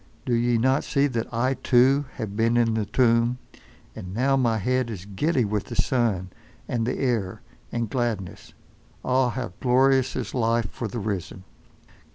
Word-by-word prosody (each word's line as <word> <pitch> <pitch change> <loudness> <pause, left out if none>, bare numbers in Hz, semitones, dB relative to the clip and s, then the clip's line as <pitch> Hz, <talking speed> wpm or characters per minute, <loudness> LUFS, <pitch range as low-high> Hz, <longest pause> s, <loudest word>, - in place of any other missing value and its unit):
Do 125 - 0
ye 120 0 +2
not 130 +4 +2
see 140 0 +1
that 120 -5 -2
I, 125 +3 +1
too, 130 +2 +3
have 105 -2 -5
been 115 +2 +2
in 115 -1 +2
the 110 -2 -1
tomb, 115 +1 +2 0.6
and 90 +1 -7
now 135 +4 +2
my 120 -4 +2
head 125 +3 0
is 100 -5 -7
giddy 125 - 0
with 105 -1 -2
the 120 - -7
sun, 115 -7 0 0.4
and 115 -1 -1
the 125 - -1
air, 115 -8 -1 0.3
and 115 -1 -2
gladness. 110 -6 -4 0.5
Ah! 130 0 +2
how 125 -7 -5
glorious 130 +1 +3
is 125 -5 -4
life 115 -3 0
for 120 - -4
the 115 - -6
risen! 95 -3 -4
120 Hz, 170 wpm, -25 LUFS, 110-130 Hz, 0.6 s, too